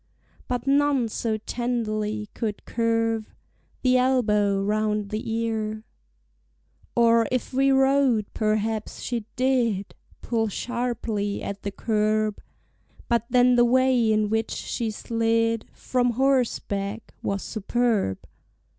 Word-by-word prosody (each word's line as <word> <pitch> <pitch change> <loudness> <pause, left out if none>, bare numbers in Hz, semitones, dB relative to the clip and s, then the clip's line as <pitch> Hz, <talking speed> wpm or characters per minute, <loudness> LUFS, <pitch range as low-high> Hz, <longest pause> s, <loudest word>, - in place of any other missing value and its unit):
But 245 -1 -2
none 275 -3 +2
so 220 0 -1
tenderly 215 -2 -2
could 215 -3 -4
curve 225 -1 0 0.5
The 255 -1 +4
elbow 210 -6 +2
round 210 0 0
the 215 +1 -3
ear: 220 -1 -2 1.1
Or 230 -1 +4
if 255 +1 -2
we 270 +1 +3
rode, 265 -4 +3
perhaps 215 0 -1
she 235 -3 -3
did 240 -6 +1 0.3
Pull 225 -2 0
sharply 230 -2 -2
at 200 0 -5
the 200 - -3
curb; 215 0 0 0.7
But 235 -1 +2
then 250 0 +5
the 240 0 +5
way 250 -2 +3
in 215 -1 +2
which 225 0 0
she 230 -2 -3
slid 230 +1 0
From 245 -1 0
horseback 230 -5 0
was 200 -1 -2
superb! 220 - 0
225 Hz, 110 wpm, -25 LUFS, 215-245 Hz, 1.1 s, then